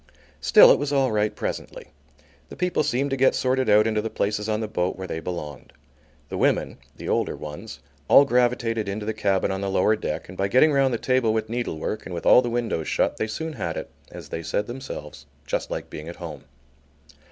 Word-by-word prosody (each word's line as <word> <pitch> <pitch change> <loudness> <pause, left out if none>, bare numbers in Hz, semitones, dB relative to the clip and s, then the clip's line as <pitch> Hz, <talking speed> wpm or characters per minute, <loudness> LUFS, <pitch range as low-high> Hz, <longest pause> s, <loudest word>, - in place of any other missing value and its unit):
Still, - - +7
it - - +4
was 145 0 -2
all 135 -3 +2
right 105 0 0
presently. - - -5 0.6
The - - -9
people 180 0 0
seemed 140 0 0
to - - +1
get 135 0 +3
sorted 130 -1 +1
out 105 +1 +6
into 110 -1 +1
the 115 - -3
places 105 +1 -2
on 110 0 0
the 110 - -3
boat 90 -3 -1
where 95 - -6
they 80 - -4
belonged. 75 -6 -7 0.6
The - - -4
women, - - +1 0.2
the - - -8
older - - 0
ones, 75 +9 -9 0.3
all 140 - +7
gravitated 120 -4 +1
into 105 +2 -4
the 110 - -1
cabin 100 -4 0
on 95 0 -3
the 100 - -2
lower 95 +3 +3
deck 75 - -4
and 90 - -10
by 95 +1 0
getting 130 +9 +5
round 135 -1 +3
the 120 - 0
table 130 -2 +1
with 110 -1 -2
needlework, 115 -5 -3
and 90 - -6
with 85 - -6
all - - +7
the 120 - -3
windows 115 -9 -2
shut, - - 0
they 110 - -1
soon 160 +8 -4
had 120 - -4
it, - - -6 0.2
as - - -10
they 85 - -4
said 85 +5 -2
themselves, 120 - -8 0.2
just - - -2
like - - -5
being 75 +2 -7
at 85 - -8
home. 85 -4 -8
110 Hz, 220 wpm, -24 LUFS, 95-125 Hz, 0.6 s, Still